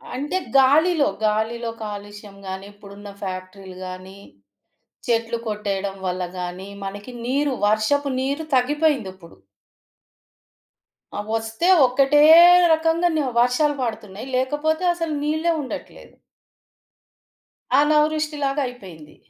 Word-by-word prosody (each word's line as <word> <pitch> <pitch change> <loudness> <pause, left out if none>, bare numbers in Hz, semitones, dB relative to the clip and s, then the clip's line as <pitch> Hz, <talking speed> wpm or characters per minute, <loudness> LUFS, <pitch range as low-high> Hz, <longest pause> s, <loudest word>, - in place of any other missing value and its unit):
అంటే 290 +8 -2 0.2
గాలిలో, 295 +4 +4 0.2
గాలిలో 220 +2 -1
కాలుష్యం 205 -1 -9
గానీ 190 +1 -6
ఇప్పుడున్న 205 0 -12
ఫ్యాక్టరీ‌లు 185 0 -7
గాని, 185 +1 -10 0.9
చెట్లు 230 0 0
కొట్టేయడం 200 -2 -3
వల్ల 180 0 -2 0.2
గానీ 180 +2 -6
మనకి 205 +5 -7
నీరు, 275 +2 0
వర్షపు 220 +7 +1
నీరు 280 +4 -2
తగ్గిపోయిందిప్పుడు. 250 - -1 1.8
ఆ! - - -3
వస్తే 225 +9 -2 0.2
ఒక్కటే 275 +3 +3 0.5
రకంగాను 325 0 +1 0.2
వర్షాలు 270 +5 +2
పడతున్నాయి. 215 -1 -6
లేకపోతే 295 +6 -1
అసలు 330 -2 -3
నీళ్ళే 315 +3 0
ఉండట్లేదు. 265 - -9 1.7
అనావృష్టిలాగా 300 -1 +1
అయిపోయింది. 180 -11 -12
240 Hz, 90 wpm, -22 LUFS, 200-295 Hz, 1.8 s, గాలిలో